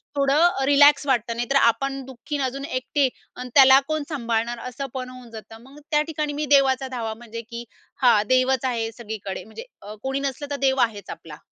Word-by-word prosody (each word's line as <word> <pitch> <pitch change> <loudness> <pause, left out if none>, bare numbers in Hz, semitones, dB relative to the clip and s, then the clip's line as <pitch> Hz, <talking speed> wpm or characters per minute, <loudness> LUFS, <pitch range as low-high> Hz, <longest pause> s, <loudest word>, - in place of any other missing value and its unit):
थोडं 275 -1 +2
अ, 325 -5 +3
रिलॅक्स 285 +1 +5
वाटतं. 235 -3 0
नाहीतर 240 +3 -2
आपण 270 +3 +1
दुःखी 265 +3 -6
अन् 275 - -1
अजून 275 +2 -4
एकटे 265 +1 0 0.3
आणि 250 0 -7
त्याला 265 -1 +8
कोण 310 -1 -2
सांभाळणार 235 -4 -2
असं 265 +3 -6
पण 255 -1 -4
होऊन 255 -1 -12
जातं. 225 0 -11
मग 275 +3 -15
त्या 300 -1 +3
ठिकाणी 300 -1 -3
मी 300 +1 -2
देवाचा 265 -1 +2
धावा 230 -4 -4
म्हणजे, 230 0 -9
की 235 0 -7 0.4
हां 230 -4 +5
देवच 255 0 +2
आहे 230 -3 -2
सगळीकडे, 215 -4 -6
म्हणजे 340 - -11 0.2
अ, 210 +1 -9
कोणी 270 +1 -2
नसलं 280 +1 -4
तर - - -1
देव 265 0 +1
आहेच 210 -5 -1
आपला. 155 -2 -9
260 Hz, 200 wpm, -23 LUFS, 235-275 Hz, 0.4 s, त्याला